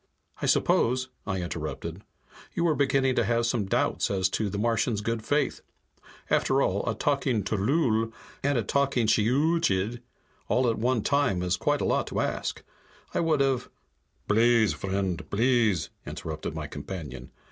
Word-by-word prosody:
"I -, -, 0 dB
suppose," 130 Hz, +2 st, +2 dB, 0.2 s
I 95 Hz, -2 st, -1 dB
interrupted, 85 Hz, -, -5 dB, 0.5 s
"you 170 Hz, -, 0 dB
were 165 Hz, -2 st, +3 dB
beginning 135 Hz, -2 st, +2 dB
to -, -, +4 dB
have 115 Hz, +1 st, +1 dB
some 115 Hz, -4 st, 0 dB
doubts -, -, +1 dB
as 95 Hz, -1 st, +1 dB
to 105 Hz, +2 st, -1 dB
the 100 Hz, -, -4 dB
Martian's 115 Hz, 0 st, +1 dB
good 115 Hz, +1 st, -2 dB
faith? 145 Hz, +5 st, 0 dB, 0.7 s
After 135 Hz, -, +2 dB
all, 100 Hz, -6 st, +1 dB
a 110 Hz, -, -1 dB
talking 135 Hz, -4 st, 0 dB
tllooll 115 Hz, -, +1 dB, 0.3 s
and 140 Hz, -1 st, +1 dB
a 115 Hz, -, +1 dB
talking 135 Hz, +1 st, +1 dB
shiyooch'iid 120 Hz, -, +2 dB, 0.5 s
all 125 Hz, 0 st, +2 dB
at 115 Hz, -2 st, 0 dB
one 120 Hz, -1 st, +1 dB
time 140 Hz, -11 st, +1 dB
is 90 Hz, 0 st, +1 dB
quite -, -, 0 dB
a -, -, 0 dB
lot -, -, +1 dB
to -, -, -3 dB
ask. -, -, -2 dB, 0.5 s
I -, -, 0 dB
would 160 Hz, -4 st, +2 dB
have 135 Hz, -2 st, +1 dB, 0.3 s
" -, -, -43 dB
"Blease, 115 Hz, 0 st, +4 dB
vriend, 95 Hz, -2 st, -3 dB
blease!" 115 Hz, -4 st, +2 dB, 0.2 s
interrupted 80 Hz, -1 st, -5 dB
my -, -, -4 dB
companion. 70 Hz, -9 st, -7 dB
115 Hz, 160 wpm, -27 LUFS, 100-130 Hz, 0.7 s, to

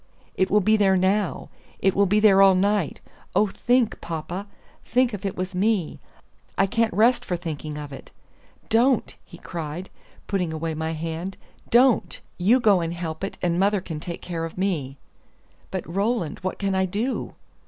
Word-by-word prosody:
"It 190 Hz, -, +1 dB
will 210 Hz, +1 st, +4 dB
be 215 Hz, +3 st, +4 dB
there 195 Hz, -2 st, +4 dB
now! 190 Hz, +1 st, 0 dB, 0.3 s
it 195 Hz, -, +2 dB
will 200 Hz, 0 st, +3 dB
be 210 Hz, +3 st, +3 dB
there 200 Hz, -2 st, +6 dB
all 195 Hz, -1 st, +7 dB
the 185 Hz, -, +2 dB
night! 200 Hz, -5 st, 0 dB, 0.3 s
Oh, 205 Hz, +3 st, +5 dB
think, 240 Hz, +3 st, +1 dB
papa, 170 Hz, +4 st, -5 dB, 0.4 s
think 250 Hz, -1 st, +1 dB
if 200 Hz, -1 st, -3 dB
it 195 Hz, -, -5 dB
was 185 Hz, +1 st, -3 dB
me! 195 Hz, -2 st, 0 dB, 0.6 s
I 195 Hz, -, +4 dB
can't 230 Hz, +2 st, +1 dB
rest 225 Hz, +7 st, +3 dB
for 180 Hz, -, -2 dB
thinking 155 Hz, -2 st, -5 dB
of 145 Hz, -2 st, -7 dB
it. 135 Hz, -, -10 dB, 0.6 s
Don't!" 240 Hz, +2 st, +2 dB
he 170 Hz, -, -14 dB
cried, 170 Hz, +1 st, -6 dB, 0.3 s
putting 180 Hz, -5 st, -1 dB
away 160 Hz, +1 st, -3 dB
my 160 Hz, +1 st, -3 dB
hand, 165 Hz, +4 st, -5 dB, 0.3 s
"don't! 245 Hz, 0 st, +3 dB, 0.2 s
You 220 Hz, +9 st, +4 dB
go 205 Hz, -6 st, +4 dB
and 165 Hz, +1 st, -3 dB
help 165 Hz, -1 st, -5 dB
it, 195 Hz, -, -4 dB
and 175 Hz, 0 st, +1 dB
mother 200 Hz, +1 st, +3 dB
can 165 Hz, -4 st, -6 dB
take 170 Hz, +2 st, -7 dB
care 170 Hz, -2 st, -4 dB
of 165 Hz, +1 st, -6 dB
me." 155 Hz, -9 st, -2 dB, 0.7 s
"But, -, -, -4 dB
Roland, 195 Hz, -2 st, -1 dB
what 185 Hz, 0 st, -3 dB
can 195 Hz, -1 st, -1 dB
I 190 Hz, 0 st, +2 dB
do?" 220 Hz, +8 st, -3 dB
190 Hz, 180 wpm, -24 LUFS, 170-210 Hz, 0.7 s, all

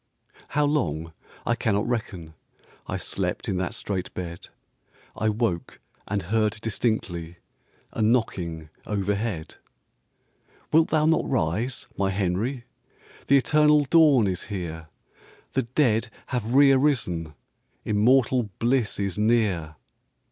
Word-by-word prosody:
How 150 Hz, -, +4 dB
long 85 Hz, -, -1 dB, 0.3 s
I 120 Hz, -, +2 dB
cannot 105 Hz, -2 st, 0 dB
reckon, 100 Hz, -9 st, -4 dB, 0.5 s
I -, -, -2 dB
slept -, -, -3 dB
in 95 Hz, -, -1 dB
that 90 Hz, -1 st, -2 dB
strait 95 Hz, -3 st, -3 dB
bed; 85 Hz, -1 st, -6 dB, 0.7 s
I 110 Hz, -, 0 dB
woke 105 Hz, -6 st, -2 dB, 0.3 s
and 100 Hz, -1 st, -2 dB
heard 105 Hz, +3 st, +1 dB
distinctly 100 Hz, -7 st, -2 dB, 0.5 s
A -, -, -4 dB
knocking 90 Hz, -9 st, 0 dB, 0.2 s
overhead. 100 Hz, -3 st, -2 dB, 1.2 s
"Wilt 160 Hz, +1 st, +5 dB
thou 155 Hz, -1 st, +2 dB
not 160 Hz, +1 st, +2 dB
rise, 115 Hz, -, -1 dB
my 100 Hz, -1 st, +2 dB
Henry? 100 Hz, +7 st, -1 dB, 0.6 s
The 140 Hz, -, +6 dB
eternal 150 Hz, +1 st, +4 dB
dawn 145 Hz, -7 st, +5 dB
is 95 Hz, -2 st, -2 dB
here; 85 Hz, -5 st, -5 dB, 0.6 s
The -, -, +1 dB
dead 115 Hz, -5 st, +2 dB, 0.2 s
have 120 Hz, 0 st, -2 dB
re 140 Hz, 0 st, +7 dB
arisen, 110 Hz, -, +1 dB, 0.5 s
Immortal 120 Hz, +2 st, +3 dB
bliss 120 Hz, -3 st, +1 dB
is 100 Hz, 0 st, -2 dB
near." 105 Hz, -8 st, +1 dB
110 Hz, 115 wpm, -25 LUFS, 90-125 Hz, 1.2 s, re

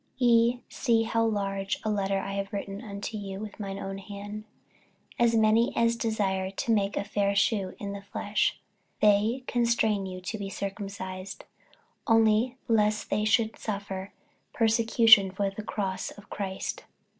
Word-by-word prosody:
48:006:011 250 Hz, -, +3 dB
Ye 235 Hz, +1 st, +4 dB
see 230 Hz, -4 st, +1 dB
how 230 Hz, 0 st, +1 dB
large 195 Hz, -3 st, -1 dB
a 215 Hz, -, 0 dB
letter 195 Hz, -1 st, 0 dB
I 195 Hz, +1 st, -3 dB
have 195 Hz, 0 st, -3 dB
written 200 Hz, 0 st, -5 dB
unto 210 Hz, 0 st, -6 dB
you 195 Hz, -1 st, -6 dB
with 215 Hz, +1 st, -8 dB
mine 195 Hz, -1 st, -4 dB
own 195 Hz, 0 st, -5 dB
hand. 205 Hz, +2 st, -8 dB, 0.7 s
48:006:012 240 Hz, -, +5 dB
As 230 Hz, -, +1 dB
many 220 Hz, +2 st, +4 dB
as 230 Hz, 0 st, +3 dB
desire 200 Hz, -5 st, -1 dB
to 195 Hz, +4 st, -2 dB
make 205 Hz, -2 st, +1 dB
a -, -, 0 dB
fair 200 Hz, -1 st, 0 dB
shew 200 Hz, -2 st, +1 dB
in 200 Hz, -1 st, -5 dB
the 200 Hz, 0 st, -6 dB
flesh, 205 Hz, +1 st, -1 dB, 0.4 s
they 215 Hz, +5 st, +3 dB
constrain 230 Hz, -5 st, +1 dB
you 185 Hz, -1 st, -6 dB
to 195 Hz, +4 st, -5 dB
be 195 Hz, -1 st, -4 dB
circumcised; 195 Hz, -1 st, -6 dB, 0.6 s
only 225 Hz, +2 st, +3 dB
lest 215 Hz, -2 st, +1 dB
they 210 Hz, +1 st, +1 dB
should 220 Hz, 0 st, +2 dB
suffer 200 Hz, -2 st, -4 dB, 0.4 s
persecution 225 Hz, -2 st, +5 dB
for 195 Hz, +1 st, -1 dB
the 195 Hz, -, -6 dB
cross 195 Hz, -3 st, -3 dB
of 205 Hz, -, -14 dB
Christ. 190 Hz, -2 st, -4 dB
205 Hz, 160 wpm, -28 LUFS, 195-225 Hz, 0.7 s, 48:006:012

